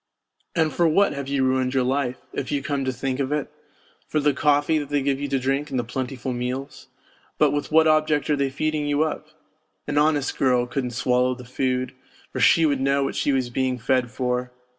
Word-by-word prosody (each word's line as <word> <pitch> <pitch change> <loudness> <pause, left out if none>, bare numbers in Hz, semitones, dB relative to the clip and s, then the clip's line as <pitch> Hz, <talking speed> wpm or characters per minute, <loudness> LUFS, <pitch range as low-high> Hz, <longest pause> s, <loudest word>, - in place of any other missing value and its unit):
And 160 -3 +1
for 170 - +3
what 195 +6 +3
have 140 -1 -5
you 140 -1 0
ruined 130 0 +1
your 130 - +3
life, 130 0 -1 0.2
if 135 - -4
you 140 -1 -1
come 140 -2 -1
to 130 - 0
think 130 +1 -3
of 135 0 -1
it? 150 -2 -2 0.6
For 155 - 0
the 145 -1 +2
coffee 145 +2 +2
they 145 -1 -1
give 135 -1 0
you 145 - -2
to 140 -1 0
drink 135 +3 -1
and 130 - -2
the 120 - 0
plentiful 130 +1 -4
meals? 125 +3 -5 0.5
But - - +4
with 145 +1 -3
what 160 +1 +5
object 155 -1 +2
are - - +4
they 140 -1 0
feeding 150 +2 -1
you 145 +1 +2
up? 155 -1 -4 0.6
An 145 0 +1
honest 150 -2 +1
girl 125 -2 +3
couldn't 125 0 -3
swallow 125 0 +2
the 125 0 -11
food, 130 0 -1 0.4
for - - -4
she 165 - +5
would 140 -3 +1
know 140 +1 +2
what - - -3
she - - +1
was 130 -3 0
being 130 0 0
fed 125 +1 +1
for. 125 0 -2
135 Hz, 215 wpm, -23 LUFS, 130-145 Hz, 0.6 s, what